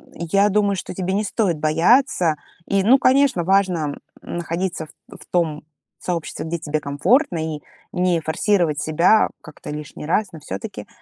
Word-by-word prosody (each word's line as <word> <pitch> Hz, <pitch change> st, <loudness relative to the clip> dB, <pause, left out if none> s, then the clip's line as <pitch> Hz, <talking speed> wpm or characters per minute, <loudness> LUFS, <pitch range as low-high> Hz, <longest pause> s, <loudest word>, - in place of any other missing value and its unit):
я 195 Hz, +5 st, +2 dB
думаю, 205 Hz, 0 st, +2 dB
что 185 Hz, -, -6 dB
тебе 185 Hz, 0 st, -2 dB
не 205 Hz, +2 st, +1 dB
стоит 195 Hz, -6 st, -1 dB
бояться. 165 Hz, -, +3 dB, 0.3 s
И, 195 Hz, -1 st, +1 dB
ну, 245 Hz, +7 st, +6 dB
конечно, 260 Hz, -6 st, +3 dB
важно, 180 Hz, -5 st, +1 dB, 0.3 s
м, -, -, -6 dB
находиться 170 Hz, -1 st, -3 dB
в -, -, -22 dB, 0.3 s
в -, -, -14 dB
том 160 Hz, -4 st, 0 dB, 0.4 s
сообществе, 170 Hz, -3 st, -4 dB
где 170 Hz, +1 st, -2 dB
тебе 155 Hz, -1 st, -2 dB
комфортно, 170 Hz, -, +1 dB, 0.2 s
и -, -, -17 dB, 0.3 s
не 180 Hz, -1 st, +1 dB
форсировать 160 Hz, 0 st, +1 dB
себя 170 Hz, +7 st, +3 dB
как-то 155 Hz, -, -11 dB
лишний 150 Hz, 0 st, -7 dB
раз, 205 Hz, +5 st, +1 dB
но 160 Hz, -, -9 dB
все-таки 205 Hz, +10 st, -7 dB
175 Hz, 160 wpm, -21 LUFS, 160-200 Hz, 0.4 s, ну